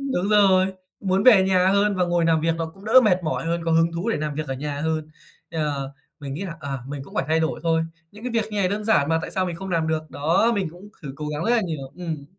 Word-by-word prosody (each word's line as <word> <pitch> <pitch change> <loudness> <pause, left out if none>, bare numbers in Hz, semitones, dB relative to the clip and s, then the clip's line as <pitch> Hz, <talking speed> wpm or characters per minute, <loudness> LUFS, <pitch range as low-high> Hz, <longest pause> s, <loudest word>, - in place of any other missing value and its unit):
Đúng 185 +3 0
rồi, 195 -3 +5 0.3
muốn 190 0 +1
về 215 -5 +7
nhà 185 -1 +3
hơn 200 +1 +3
và 180 - +2
ngồi 175 -1 +1
làm 165 -1 +3
việc 165 0 +1
nó 165 - -2
cũng 195 +2 -16
đỡ 225 +4 +7
mệt 185 -3 +3
mỏi 160 0 -2
hơn, 170 0 -1
có 165 - 0
hứng 165 +1 +3
thú 170 +7 -3
để - - 0
làm 150 -1 -3
việc 155 0 -3
ở 135 - -2
nhà 145 +1 -4
hơn. 160 0 -2 0.4
Ờ, 145 -4 -2 0.3
mình 140 -1 -5
nghĩ 180 - -5
là, 170 -3 -5
à, 140 -2 -4
mình 140 -1 -5
cũng - - -14
phải - - 0
thay 160 +1 +2
đổi 160 - -1
thôi. 165 -1 +2 0.3
Những 210 - -13
cái 250 - -2
việc 225 -2 +1
như 210 - -3
này 185 -2 +2
đơn 210 +2 -3
giản 155 -10 +3
mà 165 0 +2
tại - - -5
sao 185 -1 -1
mình 170 -2 -4
không 190 +1 -7
làm 165 -2 0
được. 155 -1 -2
Đó, 165 - +2
mình 190 -5 -1
cũng 180 +4 -13
thử 140 -3 -6
cố 150 -1 -5
gắng 150 +2 -3
rất 230 - +1
là 240 -1 +4
nhiều. 155 -8 -5
Ừm. 165 -5 -5
165 Hz, 290 wpm, -23 LUFS, 155-190 Hz, 0.4 s, về